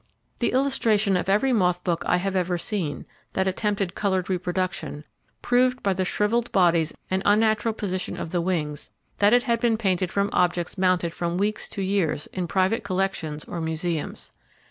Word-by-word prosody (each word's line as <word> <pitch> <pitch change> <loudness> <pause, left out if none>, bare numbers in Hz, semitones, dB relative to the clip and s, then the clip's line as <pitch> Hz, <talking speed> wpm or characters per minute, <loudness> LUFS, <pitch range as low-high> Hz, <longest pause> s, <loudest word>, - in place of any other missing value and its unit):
The 240 - +1
illustration 225 -7 +2
of 180 - -1
every 230 +7 +3
moth 180 -5 +2
book 170 -2 0
I 180 - +3
ever 185 -1 -1
have - - -3
seen, 170 -10 -3 0.3
that 190 0 +1
attempted 195 -1 -1
coloured 190 -2 -1
reproduction, 180 -4 -2 0.4
proved 250 +1 +2
by 195 - +2
the 185 0 -1
shrivelled 225 +5 0
bodies 170 -4 +3 0.2
and 190 0 +1
unnatural 220 +2 +3
position 185 -4 -3
of 160 - -5
the 175 - 0
wings, 155 -5 -2 0.3
that 205 +1 +5
it 245 +1 +5
had 235 -2 +1
been 230 -1 +2
painted 185 -4 0
from 200 0 0
objects 175 -1 +1
mounted 185 -3 +1
from 170 0 -2
weeks 210 +2 -1
to 195 - -4
years 185 -6 0
in 180 -2 -2
private 190 +5 +1
collections 185 -6 -2
or 170 - -5
museums. 160 0 -3
190 Hz, 170 wpm, -25 LUFS, 175-210 Hz, 0.4 s, that